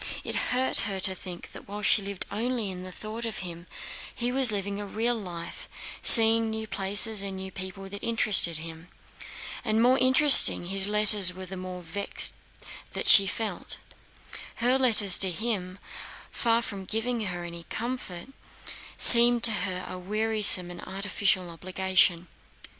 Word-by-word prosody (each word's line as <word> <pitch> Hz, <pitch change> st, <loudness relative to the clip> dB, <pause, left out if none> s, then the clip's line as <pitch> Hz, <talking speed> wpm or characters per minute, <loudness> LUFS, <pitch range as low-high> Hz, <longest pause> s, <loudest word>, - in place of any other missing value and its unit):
It -, -, -6 dB
hurt 255 Hz, +1 st, 0 dB
her 195 Hz, -1 st, -5 dB
to 190 Hz, 0 st, -2 dB
think 180 Hz, -1 st, -10 dB
that -, -, -14 dB
while 205 Hz, +1 st, -8 dB
she 210 Hz, -, +2 dB
lived 200 Hz, -1 st, -5 dB
only 230 Hz, -1 st, -3 dB
in 180 Hz, -1 st, -9 dB
the 185 Hz, 0 st, -9 dB
thought 215 Hz, +5 st, -9 dB
of 225 Hz, -2 st, -5 dB
him, 170 Hz, 0 st, -10 dB, 0.5 s
he 240 Hz, +1 st, -3 dB
was 260 Hz, -2 st, +2 dB
living 200 Hz, 0 st, -4 dB
a -, -, -7 dB
real 230 Hz, +4 st, -2 dB
life, 175 Hz, -7 st, -7 dB, 0.3 s
seeing 225 Hz, -1 st, +5 dB
new 220 Hz, 0 st, -5 dB
places 205 Hz, +1 st, 0 dB
and 195 Hz, -1 st, -6 dB
new 190 Hz, 0 st, -8 dB
people 190 Hz, +1 st, -8 dB
that 200 Hz, +1 st, -9 dB
interested 210 Hz, -7 st, +3 dB
him. 165 Hz, +1 st, -11 dB, 0.8 s
The 220 Hz, -3 st, -1 dB
more 245 Hz, +4 st, +2 dB
interesting 260 Hz, -7 st, +5 dB
his 195 Hz, 0 st, +2 dB
letters 210 Hz, -3 st, +6 dB
were 185 Hz, 0 st, -9 dB
the 190 Hz, +1 st, -10 dB
more 185 Hz, -1 st, -9 dB
vexed 200 Hz, +5 st, -4 dB, 0.7 s
she 195 Hz, -1 st, +7 dB
felt. 220 Hz, +3 st, -3 dB, 0.8 s
Her 250 Hz, +3 st, 0 dB
letters 215 Hz, -7 st, +2 dB
to 190 Hz, -, +3 dB
him, 185 Hz, -1 st, -5 dB, 0.5 s
far 230 Hz, 0 st, -1 dB
from 195 Hz, -4 st, -7 dB
giving 225 Hz, +2 st, -3 dB
her 175 Hz, -2 st, -6 dB
any 170 Hz, -1 st, -9 dB
comfort, 235 Hz, -5 st, -6 dB, 0.7 s
seemed 240 Hz, 0 st, +6 dB
to 230 Hz, -, +7 dB
her 185 Hz, -3 st, -4 dB
a 185 Hz, -, -8 dB
wearisome 210 Hz, -2 st, +2 dB
and 175 Hz, -, -11 dB
artificial 190 Hz, -2 st, -3 dB
obligation. 180 Hz, 0 st, 0 dB
200 Hz, 155 wpm, -25 LUFS, 185-225 Hz, 0.8 s, she